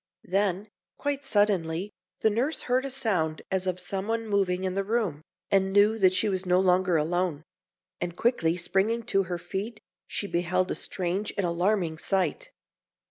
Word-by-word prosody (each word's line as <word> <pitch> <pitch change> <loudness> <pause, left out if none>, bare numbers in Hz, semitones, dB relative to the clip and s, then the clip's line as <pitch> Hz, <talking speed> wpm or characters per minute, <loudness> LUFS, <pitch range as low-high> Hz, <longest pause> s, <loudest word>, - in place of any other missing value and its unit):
Then, 195 +2 0 0.3
quite 285 -1 -2
suddenly, 205 -6 +1 0.3
the 220 - +4
nurse 260 +9 0
heard 255 +2 +1
a - - -3
sound 195 -12 -1
as 190 0 0
of 185 -1 -1
someone 200 +5 -1
moving 190 -3 +1
in 185 -1 -1
the 195 +1 0
room, 205 -8 -1 0.3
and 195 -1 +3
knew 205 +3 +4
that 185 -2 +4
she - - +2
was 190 -2 0
no 180 -1 +3
longer 185 -2 +3
alone; 165 0 0 0.6
and 175 0 -4
quickly 180 -9 +2
springing 200 +6 0
to 195 -4 +1
her 175 0 -3
feet, 195 +6 -5 0.3
she - - -2
beheld 185 0 0
a - - -1
strange 190 +3 -2
and 195 - +1
alarming 175 -1 0
sight. 195 - -1
190 Hz, 165 wpm, -27 LUFS, 180-215 Hz, 0.6 s, the